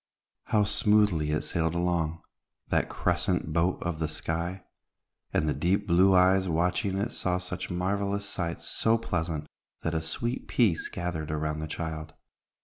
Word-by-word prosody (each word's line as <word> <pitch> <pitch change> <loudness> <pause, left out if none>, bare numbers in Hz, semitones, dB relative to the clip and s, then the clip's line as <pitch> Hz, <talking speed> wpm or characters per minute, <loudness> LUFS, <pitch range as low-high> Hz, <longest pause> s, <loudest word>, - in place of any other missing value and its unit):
How 105 -1 +3
smoothly 105 -6 +3
it 75 0 0
sailed 80 0 0
along, 85 -2 0 0.5
that - - +1
crescent 90 -2 0
boat 85 +3 +2
of 85 -2 -2
the 80 - 0
sky; 85 +4 -3 0.7
and 75 - +1
the 75 - +2
deep 90 +8 +1
blue 95 +2 +5
eyes 95 +1 +4
watching 90 +4 +1
it 105 +5 -1
saw 90 -1 0
such 90 0 -5
marvelous 100 +3 -1
sights 85 -2 -3
so 115 +1 +2
pleasant, 80 -8 -2 0.4
that 80 - -1
a 80 - 0
sweet 120 +10 -3
peace 105 -10 +2
gathered 85 -3 -4
around 75 0 -2
the 80 - -4
child. 80 0 -5
85 Hz, 150 wpm, -28 LUFS, 80-95 Hz, 0.7 s, blue